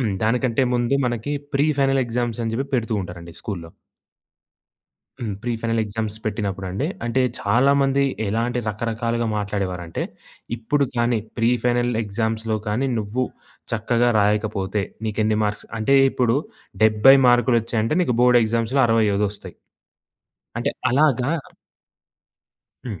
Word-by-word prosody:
హ్మ్. 110 -6 0
దానికంటే 125 +3 +1
ముందు 120 +2 +1
మనకి 120 +4 -2 0.2
ప్రీ 140 +2 +3
ఫైనల్ 135 -1 +3
ఎగ్జామ్స్ 120 0 -2
అని 115 - -2
చెప్పి 135 +3 -2
పెడుతూ 115 -2 0
ఉంటారండి 85 -2 -9
స్కూలులో. 85 -6 -6 1.5
హ్మ్. 110 -4 -3
Pre 120 0 -1
final 115 -1 0
exams 105 0 -4
పెట్టినప్పుడండి. 100 +2 -2 0.2
అంటే, 125 +2 +1 0.2
చాలా 125 +7 +3
మంది 135 0 +2 0.2
ఎలాంటి 115 +4 -1
రకరకాలుగా 115 +2 -2
మాట్లాడేవారంటే, 95 -5 -3 0.5
ఇప్పుడు 140 +5 +1
కానీ, 120 -1 +2 0.2
ప్రీ 115 +1 +3
ఫైనల్ 120 0 +2
ఎగ్జామ్స్‌లో 110 +1 -2
కానీ, 125 +6 0
నువ్వు 110 +5 -1 0.5
చక్కగా 120 +2 +1
రాయకపోతే, 105 -1 0 0.2
నీకెన్ని 110 0 0
మార్క్స్ 105 0 -3
అంటే 110 +5 +2 0.2
ఇప్పుడు 125 0 +1 0.5
70 110 +5 +7
మార్కులొచ్చాయంటే 120 +1 +2
నీకు 125 -8 0
బోర్డ్ 125 -1 +6
ఎగ్జామ్స్‌లో 115 +4 0
65 105 -2 +2
ఒస్తాయి. 105 - -10 1.0
అంటే - - 0 0.2
అలాగా 135 -2 +3 1.6
హ్మ్. 105 -7 -5
115 Hz, 120 wpm, -22 LUFS, 105-125 Hz, 1.6 s, 70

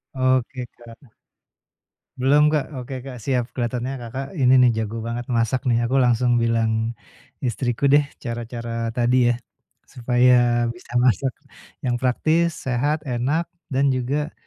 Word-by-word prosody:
Oke, 130 -1 0
Kak. 120 +2 -15 1.1
Belum 145 +3 +5
Kak, 150 -2 0
oke 130 0 -6
Kak, 130 -2 -7
siap 125 +1 0
kelihatannya 125 +1 -2
Kakak, 130 +3 -5
ini 125 0 +5
nih 125 -1 +5
jago 110 +1 -4
banget 120 +1 -4
masak 115 +3 +1
nih 115 - +3
aku 125 +3 -1
langsung 120 0 +2
bilang 115 0 0 0.5
istriku 120 +2 -1
deh 145 - +7 0.2
cara-cara 115 -1 -4
tadi 120 +1 +3
ya, - - +3 0.6
supaya 125 +1 +3 0.4
bisa 120 +1 -14
masak, 130 +2 +2 0.6
yang 125 - +1
praktis, 160 +6 +1
sehat, 135 +4 +1
enak, 135 +6 0 0.3
dan 135 +2 +2
juga, 145 +5 -2
125 Hz, 135 wpm, -22 LUFS, 120-135 Hz, 1.1 s, deh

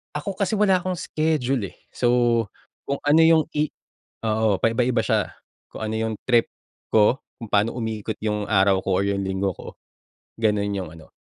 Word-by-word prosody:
Ako 185 +6 -4
kasi 200 0 -1
wala 195 -3 +5
akong 185 +1 -2
schedule, 135 - -1
eh. - - -25
So, 120 -1 +2 0.4
kung 140 - -3
ano 145 +2 +4
yong 160 -1 +5
i 150 +1 0 0.5
oo, 110 -2 +2
pa-iba-iba 115 +2 +1
siya. 110 -2 0 0.3
Kung - - -7
ano 110 0 -3
yung 110 0 -1
trip 120 -2 +3 0.4
ko. 110 +4 +3 0.2
Kung 115 -3 -10
paano 105 +3 +2
umikot 110 -2 -3
'yong 105 -1 -1
araw 95 -2 +3
ko 95 -1 0
o - - +2
'yong 100 0 0
linggo 95 0 -1
ko. - - -12 0.7
Gano'n 105 -2 +1
yong 95 -4 -3
ano, 80 -1 -15
110 Hz, 170 wpm, -23 LUFS, 100-135 Hz, 0.7 s, wala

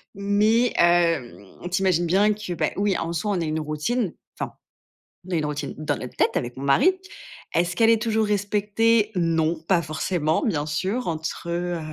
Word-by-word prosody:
Mais, 210 +4 +2
hem, 165 - +1
tu 185 - 0
imagines 180 -3 +2
bien 200 +5 +3
que, 210 -3 -5
bah, 170 - -1
oui, 200 -1 +1
en 165 +1 -3
soi, 210 +5 -1
on 185 -4 0
a - - -1
une 155 0 -1
routine, 160 +8 -2 0.2
enfin, - - -4 0.8
on - - -8
a - - +1
une 155 -2 0
routine 150 -2 -4
dans 150 -1 -1
notre 125 - -8
tête - - +1
avec 120 0 -3
mon 135 - -6
mari. 140 - +4 0.6
Est-ce 175 +1 +1
qu'elle 225 +2 +5
est 225 -1 +2
toujours 220 -1 +1
respectée? 210 +2 +1
Non, 165 -2 +1
pas 180 -3 +3
forcément, 155 +1 -1
bien 150 -9 0
sûr. 190 +11 -2
Entre, 160 0 -4
heu, 175 0 -2
175 Hz, 185 wpm, -24 LUFS, 155-210 Hz, 0.8 s, qu'elle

